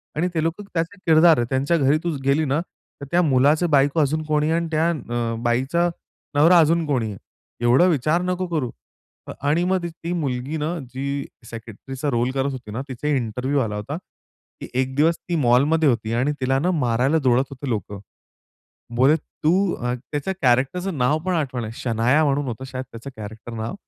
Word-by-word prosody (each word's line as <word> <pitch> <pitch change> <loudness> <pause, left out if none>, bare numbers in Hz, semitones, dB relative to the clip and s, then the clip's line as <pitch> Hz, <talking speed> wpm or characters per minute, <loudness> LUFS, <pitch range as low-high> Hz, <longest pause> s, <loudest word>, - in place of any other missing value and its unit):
आणि 165 +4 +1
ते 160 - +2
लोकं 165 +5 -2
त्याचे 170 +4 -2
किरदार 160 0 +6
आहेत 120 - 0
त्यांच्या 135 +5 +1
घरी 140 0 +3
तू 175 - -1 0.2
गेली 140 +3 +3
ना, 140 +2 +1 0.4
तर - - -5
त्या 175 - +4
मुलाचे 150 +2 +3
बायको 145 +1 +3
अजून 150 +2 +1
कोणी 150 0 +1
आहे 165 - +2
आणि 170 - -3
त्या 160 +2 +2
अ, 120 -7 -2
बाईचा 135 +9 +1 0.5
नवरा 165 +5 +6
अजून 165 +1 +3
कोणी 125 -6 0
आहे. 100 - -8 0.5
एवढा 125 +8 +5
विचार 155 +1 +2
नको 180 0 -1
करू." 155 -8 -1 0.6
अ, - - -5 0.2
आणि 165 +4 +2
मग 185 0 +1
ती 170 - -2
ती 165 +1 -7
मुलगी 140 -2 -2
ना 155 +3 -2 0.2
जी 140 +1 -3 0.2
सेक्रेटरीचा 120 +5 -6
रोल 120 +1 +1
करत 135 +1 -1
होती 125 -5 -8
ना 115 +5 -3
तिचा 130 +3 -5
इंटरव्ह्यू 130 0 0
आला 105 -4 -2
होता, 105 +9 -4 0.6
की - - -6
एक 130 0 -3
दिवस 160 +4 +3
ती 175 - -4
मॉलमध्ये 145 +3 +3
होती 115 -2 -1
आणि 130 +5 +1
तिला 135 +1 +2
ना 175 +6 +1
मारायला 130 -1 +1
दौडत 130 0 +4
होते 140 0 -6
लोकं. 105 -3 -3 1.0
बोले 135 +5 +5
तू 155 0 -2 0.2
अ 125 0 -2 0.2
त्याच्या 150 +5 -2
कॅरेक्टरच 135 +9 +2
नाव 145 -4 +1
पण 185 - 0
आठवण 130 -7 -2
आहे, 110 - -5
शनाया 120 +5 +2
म्हणून 145 0 +1
होतं 120 +1 -5
शायद 130 0 -5
त्याचं 115 +4 -8
कॅरेक्टर 110 +2 -8
नाव 110 0 -4
140 Hz, 190 wpm, -22 LUFS, 125-160 Hz, 1.0 s, किरदार